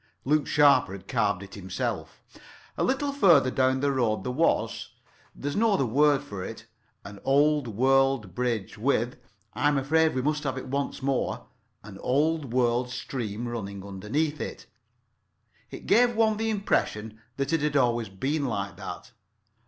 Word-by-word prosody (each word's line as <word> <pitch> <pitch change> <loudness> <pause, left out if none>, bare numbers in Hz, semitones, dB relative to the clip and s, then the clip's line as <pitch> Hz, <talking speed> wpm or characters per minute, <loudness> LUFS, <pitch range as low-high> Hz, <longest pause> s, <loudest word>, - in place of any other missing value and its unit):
Luke 150 +2 +2
Sharper 145 -9 +4
had 95 - -10
carved 100 -2 0
it 100 - -12
himself. 95 -2 -4 0.5
A - - -1
little 275 +2 0
further 170 - +5
down 130 0 +1
the 140 0 +2
road 120 -5 0
there 125 - -2
was—there's 145 0 -3
no 225 0 +3
other 135 - +2
word 145 +4 +3
for 100 -10 -7
it—an 110 -2 -12
old 145 0 +3
world 130 -2 +2
bridge 115 -3 -2
with—I'm 120 +2 -1
afraid 160 +3 +2
we 130 - -1
must 150 +1 0
have 135 -2 -2
it 130 - -5
once 140 0 -3
more—an 105 -6 -4
old 150 0 0
world 125 0 +1
stream 120 -3 -4
running 100 -4 -5
underneath 115 +11 -2
it. - - -6 1.0
It - - -10
gave 240 0 +4
one 220 -1 +2
the 225 +1 -1
impression 110 - -1 0.2
that 140 +3 -1
it 165 - +2
had 150 -1 +1
always 120 -4 +1
been 140 +10 -2
like 100 -5 -3
that. 95 -3 -8
130 Hz, 145 wpm, -27 LUFS, 110-150 Hz, 1.0 s, further